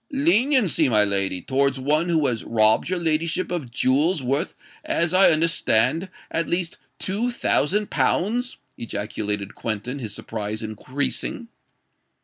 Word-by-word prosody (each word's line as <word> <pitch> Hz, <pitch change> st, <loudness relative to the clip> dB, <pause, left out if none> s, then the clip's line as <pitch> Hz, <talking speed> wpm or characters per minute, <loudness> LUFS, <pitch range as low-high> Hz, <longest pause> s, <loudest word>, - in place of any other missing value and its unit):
"Leniency, 270 Hz, -, +3 dB
my 105 Hz, -3 st, +4 dB
lady, 95 Hz, -2 st, -1 dB
towards 135 Hz, 0 st, +1 dB
one 150 Hz, +6 st, +1 dB
who 160 Hz, -3 st, +2 dB
has 120 Hz, -4 st, -1 dB
robbed 110 Hz, +3 st, +2 dB
your 185 Hz, -, 0 dB
ladyship 165 Hz, +2 st, -1 dB
of 160 Hz, -8 st, -3 dB
jewels 140 Hz, +6 st, +1 dB
worth, 135 Hz, +3 st, -1 dB, 0.3 s
as 170 Hz, 0 st, 0 dB
I 190 Hz, +1 st, +7 dB
understand, 160 Hz, -, +2 dB, 0.2 s
at 165 Hz, -, -1 dB
least 175 Hz, -1 st, -2 dB, 0.2 s
two 210 Hz, +5 st, -1 dB
thousand 210 Hz, -, 0 dB
pounds!" 245 Hz, +7 st, 0 dB, 0.2 s
ejaculated 105 Hz, -2 st, -3 dB
Quentin, 115 Hz, +5 st, -4 dB
his 110 Hz, -5 st, -5 dB
surprise 110 Hz, 0 st, -5 dB
increasing. 145 Hz, -, -3 dB
145 Hz, 125 wpm, -23 LUFS, 110-185 Hz, 0.3 s, I